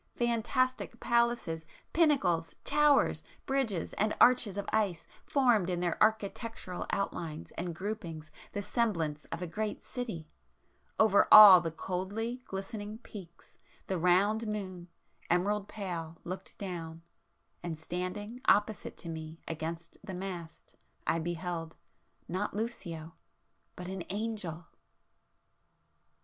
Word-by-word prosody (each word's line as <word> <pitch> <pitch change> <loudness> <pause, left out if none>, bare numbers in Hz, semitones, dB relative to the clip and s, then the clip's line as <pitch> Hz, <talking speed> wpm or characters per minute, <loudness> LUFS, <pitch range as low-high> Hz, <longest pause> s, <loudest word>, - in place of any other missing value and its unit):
—fantastic 240 +1 0
palaces, 235 -9 +1 0.3
pinnacles, 195 - +2
towers, 295 -1 +4 0.2
bridges 265 - -1
and 215 +1 0
arches 240 -6 +5
of 200 - -2
ice 200 -6 +1 0.2
formed 240 -10 +3
in 175 -1 -1
their 175 -1 -1
architectural 220 -2 0
outlines 165 -5 -3
and 170 -1 -4
groupings 170 -6 -5 0.2
the 205 - -3
semblance 165 -11 -1
of 165 +2 -5
a - - -1
great 210 +5 -3
city,—over 185 - -1
all 200 -4 +12
the 165 - -2
coldly 200 +9 -3
glistening 205 +2 -5
peaks, 195 -7 -12 0.3
the 190 -2 -2
round 200 +6 +3
moon, 185 -4 -4 0.4
emerald 200 +4 +1
pale, 170 -6 -5
looked 185 +2 -7
down,—and 170 -2 -8
standing 185 +8 -4
opposite 210 +1 +2
to - - -8
me 160 0 -6
against 165 +1 -5
the 190 -3 -6
mast, 180 -3 -7 0.3
I 165 - +1
beheld,... 170 -1 -4 0.5
not 190 +5 -2
Lucio,... 170 -8 -4 0.6
but 180 - -7
an 190 -1 -4
Angel! 200 -5 -3
190 Hz, 110 wpm, -31 LUFS, 170-220 Hz, 0.6 s, all